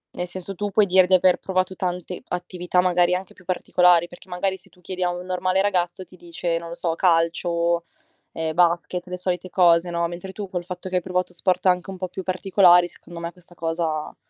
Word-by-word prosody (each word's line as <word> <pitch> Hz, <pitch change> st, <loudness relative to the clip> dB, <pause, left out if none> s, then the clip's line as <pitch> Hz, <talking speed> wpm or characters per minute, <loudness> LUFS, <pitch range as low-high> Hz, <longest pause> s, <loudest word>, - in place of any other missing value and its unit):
Nel 180 Hz, -, -3 dB
senso 185 Hz, +2 st, -6 dB
tu 205 Hz, +2 st, -3 dB
puoi 205 Hz, +1 st, +4 dB
dire 185 Hz, -1 st, +5 dB
di 185 Hz, -, +5 dB
aver 185 Hz, 0 st, +4 dB
provato 185 Hz, 0 st, -1 dB
tante 180 Hz, 0 st, -4 dB
attività, 180 Hz, 0 st, -1 dB
magari 180 Hz, 0 st, +3 dB
anche 185 Hz, 0 st, -6 dB
più 185 Hz, -, -20 dB
particolari, 180 Hz, -1 st, +3 dB
perché 175 Hz, +2 st, -15 dB
magari 190 Hz, +2 st, -1 dB
se -, -, -16 dB
tu 180 Hz, -, -25 dB
chiedi 185 Hz, +1 st, -7 dB
a 180 Hz, -, +2 dB
un 175 Hz, 0 st, -5 dB
normale 185 Hz, +1 st, 0 dB
ragazzo 185 Hz, -2 st, -1 dB
ti 185 Hz, +1 st, -17 dB
dice, 170 Hz, 0 st, -3 dB
non 170 Hz, -, -9 dB
lo 170 Hz, -, -6 dB
so, 170 Hz, -1 st, -1 dB
calcio, 170 Hz, 0 st, +1 dB, 0.5 s
ehm, 160 Hz, -1 st, -2 dB
basket, 175 Hz, +1 st, +1 dB
le 180 Hz, 0 st, -5 dB
solite 180 Hz, 0 st, -3 dB
cose 175 Hz, -1 st, +4 dB
no, 170 Hz, 0 st, 0 dB
mentre 175 Hz, +3 st, -7 dB
tu 200 Hz, +1 st, -6 dB
col 180 Hz, -2 st, -4 dB
fatto 180 Hz, 0 st, -7 dB
che 185 Hz, -, 0 dB
hai 180 Hz, -, 0 dB
provato 180 Hz, 0 st, -2 dB
sport 180 Hz, +2 st, 0 dB
anche 180 Hz, 0 st, +2 dB
un 190 Hz, -, -6 dB
po' 185 Hz, 0 st, -4 dB
più 190 Hz, -, -6 dB
particolari 185 Hz, -1 st, +4 dB
secondo 175 Hz, -1 st, -11 dB
me 170 Hz, 0 st, -5 dB
questa 175 Hz, -1 st, -16 dB
cosa 165 Hz, -2 st, -2 dB
180 Hz, 220 wpm, -23 LUFS, 175-185 Hz, 0.5 s, dire